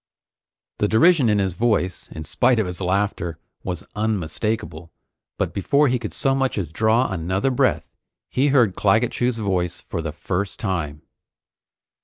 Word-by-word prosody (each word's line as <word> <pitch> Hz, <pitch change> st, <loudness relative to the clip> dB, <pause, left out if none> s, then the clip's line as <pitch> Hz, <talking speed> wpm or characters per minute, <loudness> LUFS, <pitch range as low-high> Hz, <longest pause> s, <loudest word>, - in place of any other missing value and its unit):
The 105 Hz, -, +2 dB
derision 130 Hz, -, +4 dB
in 105 Hz, -, +3 dB
his 95 Hz, -3 st, 0 dB
voice, 105 Hz, -4 st, 0 dB
in 80 Hz, -, -6 dB
spite 125 Hz, -, +2 dB
of 110 Hz, -, +2 dB
his 90 Hz, +1 st, -6 dB
laughter, 95 Hz, -3 st, -1 dB, 0.3 s
was 90 Hz, -2 st, -4 dB
unmistakable, 100 Hz, -4 st, -2 dB, 0.5 s
but -, -, -1 dB
before 140 Hz, +8 st, +2 dB
he 125 Hz, 0 st, +1 dB
could -, -, -5 dB
so 135 Hz, -, +1 dB
much 135 Hz, -2 st, 0 dB
as 85 Hz, -7 st, -3 dB
draw 110 Hz, +7 st, +2 dB
another 95 Hz, +8 st, 0 dB
breath, 125 Hz, -, 0 dB, 0.3 s
he 135 Hz, +3 st, +1 dB
heard 125 Hz, -8 st, +4 dB
Claggett 110 Hz, +4 st, +2 dB
Chew's 125 Hz, -1 st, 0 dB
voice 90 Hz, -5 st, -1 dB
for 85 Hz, -, -4 dB
the 80 Hz, -1 st, -4 dB
first 95 Hz, +5 st, -3 dB
time. 80 Hz, -7 st, -3 dB
100 Hz, 155 wpm, -22 LUFS, 90-120 Hz, 0.5 s, derision